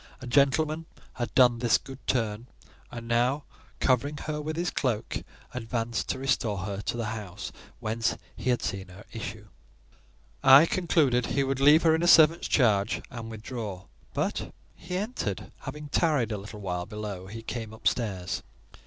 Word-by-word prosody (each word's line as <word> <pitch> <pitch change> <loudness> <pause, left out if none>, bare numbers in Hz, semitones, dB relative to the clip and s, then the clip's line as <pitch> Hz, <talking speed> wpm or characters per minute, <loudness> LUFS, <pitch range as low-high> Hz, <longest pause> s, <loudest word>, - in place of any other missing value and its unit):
A - - -8
gentleman 150 +5 +2 0.3
had 120 -2 -3
done 125 -2 +6
this 120 -1 +4
good 135 -1 -11
turn, 115 -2 0 0.4
and 115 -1 -8
now, 125 +5 +2 0.4
covering 140 +3 +2
her 150 -1 -2
with 155 +1 -3
his 175 +1 -1
cloak, 120 -4 -1 0.3
advanced 115 -1 -2
to - - 0
restore 130 -6 0
her 100 0 -4
to 120 - -3
the 115 - -2
house 105 -2 -6 0.3
whence 110 +1 -1 0.2
he 130 - -3
had 125 - +1
seen 95 -1 -3
her 95 +4 -13
issue. 110 -2 -6 1.0
I 135 +3 +9
concluded 155 -9 +2
he 140 - +1
would 135 0 -1
leave 150 +4 +7
her 160 -1 +5
in 160 - +1
a 175 - +2
servant's 165 0 +7
charge 110 -6 +2
and 115 -3 -6
withdraw; 110 -4 -6 0.3
but - - -1 0.2
he 180 +2 -5
entered: 195 - -3
having 150 +2 -7
tarried 145 -8 +2
a 105 - -1
little 105 +1 -9
while 90 -2 -3
below, 105 -4 -6
he 115 +3 -8
came 115 -1 -5
up 110 - -3
stairs. 95 -7 -1
120 Hz, 165 wpm, -28 LUFS, 105-140 Hz, 1.0 s, I